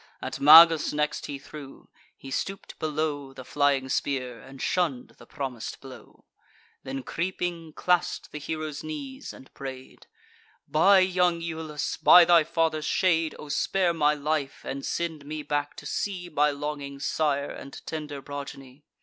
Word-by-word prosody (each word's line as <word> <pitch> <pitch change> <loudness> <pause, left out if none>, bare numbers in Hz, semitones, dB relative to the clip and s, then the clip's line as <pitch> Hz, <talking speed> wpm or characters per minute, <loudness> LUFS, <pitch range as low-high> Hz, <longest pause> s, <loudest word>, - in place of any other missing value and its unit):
At - - -5
Magus 160 +2 +8
next 150 0 -1
he 145 - -5
threw: 140 0 -12 0.3
he 135 - -10
stoop'd 195 +7 -4
below 150 -3 -2
The 130 -1 -10
flying 140 -2 +1
spear, 130 -3 -2
and 135 0 -13
shunn'd 160 -8 -1
the - - -15
promis'd 130 -6 -5
blow; 130 -1 -14 0.6
Then, 135 0 -5
creeping, 170 -1 -3
clasp'd 180 +1 0
the 150 - -6
hero's 155 0 -5
knees, 285 -3 -6
and 130 - -15
pray'd: 130 -1 -9 0.6
"By 190 +5 +5
young 180 -2 +2
Iulus, 160 -3 -4
by 175 -1 +8
thy 170 -2 +6
father's 160 -1 0
shade, 165 -4 +1
O 150 - -10
spare 180 +4 +1
my 150 -2 +2
life, 150 -1 -2
and 135 0 -5
send 165 -3 -3
me 150 +1 -6
back 145 0 -2
to - - -11
see 180 -3 -3
My 150 0 +3
longing 145 -1 -5
sire, 145 -1 0
and 140 - -9
tender 150 -3 -6
progeny! 140 -1 -9
150 Hz, 150 wpm, -27 LUFS, 140-165 Hz, 0.6 s, Magus